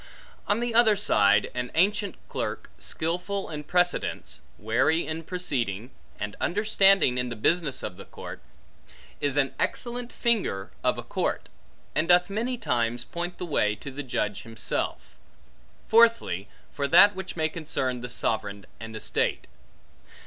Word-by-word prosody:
On 205 +3 +1
the 240 -1 -1
other 225 -2 +6
side, 105 - +3
an 125 0 -3
ancient 200 +3 +2
clerk, - - -4
skilful 180 +4 -3
in 150 -1 -5
precedents, 180 +3 0 0.2
wary 120 - +1
in 160 +1 -4
proceeding, 125 - -3 0.3
and 105 0 -4
understanding 195 - +4
in 125 0 -1
the 120 - -4
business 145 +4 +1
of 90 - -5
the - - -10
court, - - -9 0.8
is 145 -1 0
an 135 -2 +2
excellent 245 0 -2
finger 210 - 0
of - - +2
a - - -5
court; - - -2 0.4
and 155 - +1
doth 180 +2 +5
many 235 +5 -1
times 120 - -1
point 175 +5 -5
the - - -4
way 105 -10 +1
to 140 +7 -9
the 140 +2 -5
judge 105 -6 -2
himself. 115 -1 -4 0.7
Fourthly, 225 - +4 0.3
for 140 -1 -1
that 200 +7 +8
which 190 -1 -6
may 160 -2 +1
concern 135 -6 -3
the 125 - -6
sovereign 100 -4 -1
and 110 +1 -8
estate. 110 - -1
155 Hz, 145 wpm, -26 LUFS, 120-195 Hz, 0.8 s, that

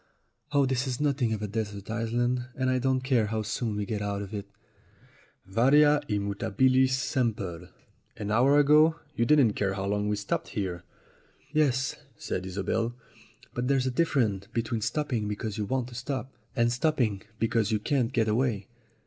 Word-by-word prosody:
Oh, 140 -1 +4
this 130 +1 0
is 125 -2 -2
nothing 140 -5 +1
of 110 -1 -2
a - - -1
desert 105 -1 -4
island, 120 +2 -1
and 130 0 0
I 130 - +1
don't 130 0 +1
care 125 -5 +2
how 110 0 -2
soon 110 0 -2
we 105 0 -2
get 105 +1 -3
out 100 0 -2
of 100 - -9
it 100 -1 -5 0.5
!" - - -29
"Varia 140 +9 +5
et 105 -1 +1
mutabilis 130 +6 +2
semper! 110 - -1 0.5
An 105 -1 -4
hour 130 +6 +4
ago 150 +2 +5 0.2
you 115 - +1
didn't 135 -6 +5
care 100 -2 -1
how 95 0 -3
long 105 +1 0
we 105 - +1
stopped 105 -1 -2
here." 90 -4 -2 0.7
"Yes," 130 -4 +1 0.2
said 95 +1 -4
Isobel; 110 +5 -1 0.6
"but 125 +1 -2
there's 135 -1 +2
a 130 - 0
difference 120 - +1
be 115 - -2
tween 115 -1 -3
stopping 125 -4 -1
because 105 +1 -4
you 105 - -1
want 130 +2 -1
to - - -12
stop 130 +2 -4 0.2
and 120 -2 +2
stopping 120 -7 +1 0.2
because 115 -1 +1
you 110 - +3
can't 125 +2 0
get 115 -4 +1
away. 110 -3 0
115 Hz, 180 wpm, -28 LUFS, 105-130 Hz, 0.7 s, Varia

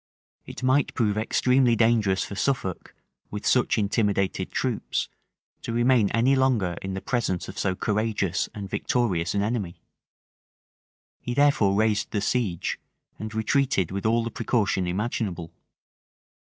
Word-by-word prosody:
It - - -8
might 130 +2 +2
prove 105 -3 +1
extremely 125 +3 +2
dangerous 110 -4 +2
for - - -8
Suffolk, 100 -3 -2 0.3
with 105 0 -6
such 125 -1 +2
intimidated 100 -2 0
troops, - - -2 0.5
to - - -5
remain 120 -2 +3
any 125 +4 +3
longer 120 -10 +1
in 95 0 -4
the 95 - -4
presence 115 -8 -1
of 95 - -7
so 95 -2 0
courageous 105 -3 -1
and 100 -2 -5
victorious 100 -4 -1
an 100 - +1
enemy; 105 -5 -3 1.4
he 120 - -4
therefore 140 -9 +3
raised 105 -1 +1
the 105 - -1
siege, 100 -5 -1 0.4
and 110 0 -6
retreated 110 - +1
with 100 +3 -2
all 115 +1 +2
the 115 - -4
precaution 105 -6 0
imaginable. 95 -3 -3
110 Hz, 135 wpm, -25 LUFS, 95-120 Hz, 1.4 s, remain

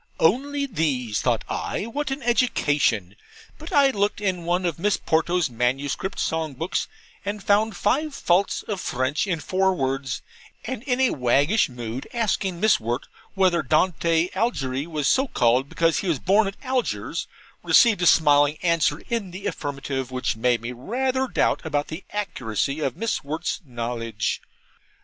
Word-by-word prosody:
Only 280 - +2
these, 145 - -1
thought - - +1
I - - -3
what 285 +6 -3
an 270 0 -4
education! 145 - +1 0.4
But 310 +2 -9
I 280 -1 +5
looked 205 -3 0
in 185 -4 -1
one 175 +2 0
of 170 -3 -2
Miss 205 +3 +2
Ponto's 170 +1 +1
manuscript 135 - -1
song 160 -3 -1
books 165 +7 -2 0.4
and 205 0 -4
found 210 +1 +2
five 285 +7 0
faults 180 +3 +1
of 200 -4 -4
French 130 +8 -1
in 175 -4 -1
four 190 +3 +1
words; 135 -3 -2 0.4
and 255 -1 -4
in 250 -2 0
a 260 - +4
waggish 140 - +2
mood 120 0 -6
asking 195 -5 0
Miss 215 +3 +4
Wirt 120 +2 -3 0.3
whether 185 -3 +3
Dante 165 +3 +2
Algiery 145 - -1
was 150 -4 -1
so 265 - +3
called 125 - +2
because 165 -1 +2
he 195 - -3
was 165 -5 +1
born 200 +8 +3
at 195 - -6
Algiers, 260 -2 -2 0.3
received 225 -7 +5
a 175 - +3
smiling 145 -2 +5
answer 165 -3 +2
in 230 -5 -2
the 190 +3 -9
affirmative, 135 -4 -3
which 130 -2 -1
made 120 0 +1
me 120 +1 -4
rather 255 - -1
doubt - - +1
about 145 -3 -1
the 160 +5 -6
accuracy 140 - -2
of 135 -5 -2
Miss 225 0 -1
Wirt's 155 +5 -3
knowledge. 115 -2 -3
165 Hz, 160 wpm, -24 LUFS, 135-210 Hz, 0.4 s, I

